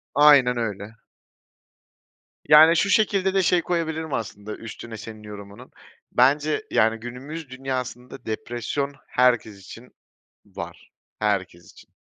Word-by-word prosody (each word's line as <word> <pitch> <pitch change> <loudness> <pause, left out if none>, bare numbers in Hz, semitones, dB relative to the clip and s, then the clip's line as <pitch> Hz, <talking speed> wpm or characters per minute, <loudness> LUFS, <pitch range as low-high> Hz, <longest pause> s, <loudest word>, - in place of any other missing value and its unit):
Aynen 140 -4 +6
öyle. 105 -2 -4 1.6
Yani, 160 +2 +8
şu 200 - +2
şekilde 195 -2 +2
de 195 -1 +2
şey 180 -1 +3
koyabilirim 160 -3 -2
aslında 105 -2 -5
üstüne 115 0 -9
senin 110 -1 -10
yorumunun. 100 -1 -11 0.4
Bence, 145 - +2
yani, 110 +1 +2
günümüz 135 +6 -8
dünyasında 130 -1 -6
depresyon 120 +5 -3
herkes 120 -5 +1
için 115 +5 -12 0.5
var, - - -10 0.3
herkes 95 -5 -2
için. - - -19
125 Hz, 110 wpm, -24 LUFS, 110-150 Hz, 1.6 s, Yani